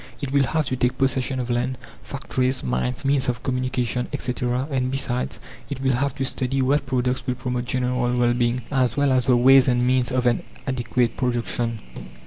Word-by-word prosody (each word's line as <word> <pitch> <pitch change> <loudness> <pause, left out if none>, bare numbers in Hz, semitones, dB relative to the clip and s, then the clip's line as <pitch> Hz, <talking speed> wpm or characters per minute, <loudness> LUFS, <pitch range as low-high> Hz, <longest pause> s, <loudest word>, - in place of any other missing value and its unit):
It 140 -3 -4
will 140 -1 +3
have 155 +5 0
to 130 - -1
take 125 -1 0
possession 135 -1 0
of 125 -1 -2
land, 125 +2 -1 0.2
factories, 130 -1 -2
mines, 65 - -2
means 135 -2 +2
of 120 -1 -3
communication, 125 -1 -1
etc., 125 -1 -2
and 130 -2 0
besides, 130 -2 -2 0.3
it 140 -3 -4
will 135 -1 +1
have 135 +2 0
to 135 - -1
study 130 +1 -1
what 140 +1 +1
products 125 0 -1
will 125 - 0
promote 125 -1 -3
general 125 -1 0
well 120 0 +3
being, 120 0 0
as 130 -2 +1
well 140 -1 +3
as 130 -1 +2
the 125 -2 +5
ways 135 +2 +6
and 125 -1 +2
means 130 0 +2
of 125 -1 0
an 120 -1 +2 0.2
adequate 125 -2 0
production. 120 -2 -1
125 Hz, 190 wpm, -23 LUFS, 120-130 Hz, 0.3 s, ways